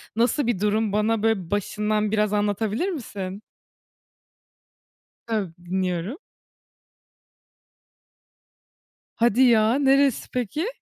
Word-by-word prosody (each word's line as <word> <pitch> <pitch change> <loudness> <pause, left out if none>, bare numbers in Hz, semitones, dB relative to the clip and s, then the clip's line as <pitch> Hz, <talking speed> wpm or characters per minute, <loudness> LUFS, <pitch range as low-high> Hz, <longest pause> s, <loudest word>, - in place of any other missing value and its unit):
nasıl 240 +4 +1
bir 235 -6 0
durum 210 +1 +1
bana, 215 +1 +1
böyle, 205 -7 0
başından 210 +1 -1
biraz 210 -1 +1
anlatabilir 210 - 0
misin? 205 - -6 1.8
Tabii, 210 -7 -2
dinliyorum. 185 - -2 3.0
Hadi 235 +1 +3
ya, 225 +3 +3
neresi 275 -2 +3
peki? 250 - -2
215 Hz, 85 wpm, -24 LUFS, 205-235 Hz, 3.0 s, Hadi